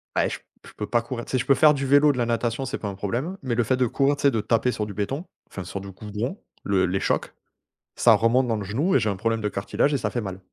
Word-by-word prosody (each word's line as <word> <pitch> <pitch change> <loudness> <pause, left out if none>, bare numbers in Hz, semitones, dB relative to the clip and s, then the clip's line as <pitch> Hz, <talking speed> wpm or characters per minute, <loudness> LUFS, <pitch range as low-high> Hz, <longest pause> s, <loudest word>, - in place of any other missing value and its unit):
Beh, - - +2
j - - -5 0.3
je - - -13
peux 105 - -5
pas 120 -1 +2
courir. 120 -1 -5
Tu - - -10
sais, 130 - +2
je 125 - -2
peux 140 - +5
faire 150 +1 +5
du 140 -1 -2
vélo, 145 +2 +5
de 130 - -5
la 120 - +1
natation, 120 +2 -1
c'est 135 +3 -4
pas 105 - -4
un 100 - -5
problème 125 - -3
mais 125 -3 -1
le 120 - +2
fait 130 +3 +1
de 130 - +2
courir, 140 +4 +1
tu 140 - -9
sais 140 - +5
de 110 - 0
taper 115 +3 +1
sur 105 -2 -3
du 100 - -8
béton 135 - -3 0.2
enfin 95 - -7
sur 100 - -6
du 95 0 -9
goudron, 105 - -5 0.2
le 95 -2 +2
les 95 +2 -1
chocs - - -1 0.6
ça - - +6
remonte 125 +3 +3
dans 115 -2 0
le 105 - -4
genou 135 - 0
et - - +6
j'ai 110 -1 0
un 100 - -1
problème 115 +2 -1
de 105 - -1
cartilage 120 +9 0
et - - +2
ça - - -2
fait 120 - -2
mal. 95 -2 -6
120 Hz, 310 wpm, -24 LUFS, 105-135 Hz, 0.6 s, ça